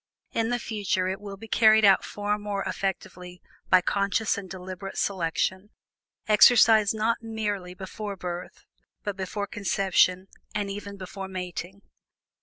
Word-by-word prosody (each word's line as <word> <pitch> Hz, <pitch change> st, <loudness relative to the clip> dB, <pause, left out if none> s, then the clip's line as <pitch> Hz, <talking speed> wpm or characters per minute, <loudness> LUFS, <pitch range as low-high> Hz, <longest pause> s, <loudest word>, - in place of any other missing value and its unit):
In 225 Hz, 0 st, 0 dB
the 245 Hz, -, +1 dB
future, 205 Hz, -5 st, -1 dB
it 190 Hz, +2 st, -3 dB
will 200 Hz, -1 st, -8 dB
be 225 Hz, +3 st, -11 dB
carried 220 Hz, -1 st, +5 dB
out 195 Hz, -, +6 dB
far 210 Hz, 0 st, -2 dB
more 205 Hz, -1 st, -3 dB
effectively 180 Hz, -2 st, -4 dB, 0.3 s
by 185 Hz, -1 st, +6 dB
conscious 200 Hz, +3 st, 0 dB
and 195 Hz, -2 st, -7 dB
deliberate 185 Hz, +1 st, -7 dB
selection, 185 Hz, +2 st, -1 dB, 0.6 s
exercised 220 Hz, -1 st, +6 dB
not 225 Hz, +2 st, 0 dB
merely 205 Hz, -5 st, -4 dB
before 200 Hz, +2 st, -6 dB
birth, 180 Hz, -1 st, -7 dB, 0.4 s
but 205 Hz, -2 st, -3 dB
before 195 Hz, +2 st, -3 dB
conception 190 Hz, -2 st, +1 dB, 0.3 s
and 205 Hz, -1 st, -1 dB
even 200 Hz, 0 st, -7 dB
before 190 Hz, +1 st, -7 dB
mating. 185 Hz, +1 st, -6 dB
200 Hz, 135 wpm, -26 LUFS, 185-210 Hz, 0.6 s, out